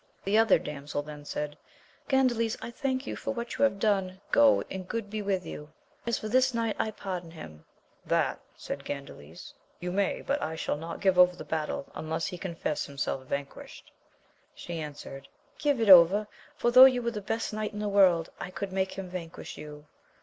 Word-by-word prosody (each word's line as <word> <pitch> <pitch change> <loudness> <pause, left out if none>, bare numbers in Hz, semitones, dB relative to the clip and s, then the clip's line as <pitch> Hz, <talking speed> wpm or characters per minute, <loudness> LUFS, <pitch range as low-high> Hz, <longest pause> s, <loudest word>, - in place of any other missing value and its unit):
The 200 +2 0
other 225 +1 +6
damsel 145 -2 -5
then 150 -1 -10
said, 150 0 -4 0.5
Gandales 240 -4 +2
I 235 - -7
thank 260 +1 -2
you - - -4
for 275 - -4
what 235 0 -4
you - - +3
have 275 -8 +3
done, 195 -3 0
go 285 -1 +5
and 185 -1 -5
good 220 -2 -4
be 215 0 -2
with 195 -3 -1
you! 150 -2 -8 0.4
as 235 - +1
for 215 - -5
this 255 +2 +3
knight, 230 -2 0
I 220 - +1
pardon 185 -5 -5
him. 80 - -11 0.4
That, - - +1 0.2
said - - -6
Gandales, 140 - -8 0.3
you 180 0 -4
may; 195 +1 0
but 285 +1 -1
I 160 - -3
shall 160 - -2
not 165 +2 -7
give 190 -2 +3
over 180 0 +7
the 155 - -9
battle, 155 -2 -2
unless 160 +1 -3
he 180 -3 -5
confess 170 -4 -3
himself 135 -2 -3
vanquished. 140 0 -6 0.6
She 170 -1 -6
answered. 145 -2 -8 0.3
Give 290 -4 +1
it 225 - +1
over, 190 +3 +8 0.3
for 240 - +1
though 255 +2 +11
you 255 -2 +3
were 235 - 0
the 210 -2 -5
best 225 +2 -3
knight 215 0 -2
in - - -7
the 210 - -2
world, 185 -5 +4
I - - -5
could 190 +1 -5
make 190 0 0
him 195 -1 -6
vanquish 175 -2 -7
you. 150 0 -10
190 Hz, 195 wpm, -29 LUFS, 160-225 Hz, 0.6 s, though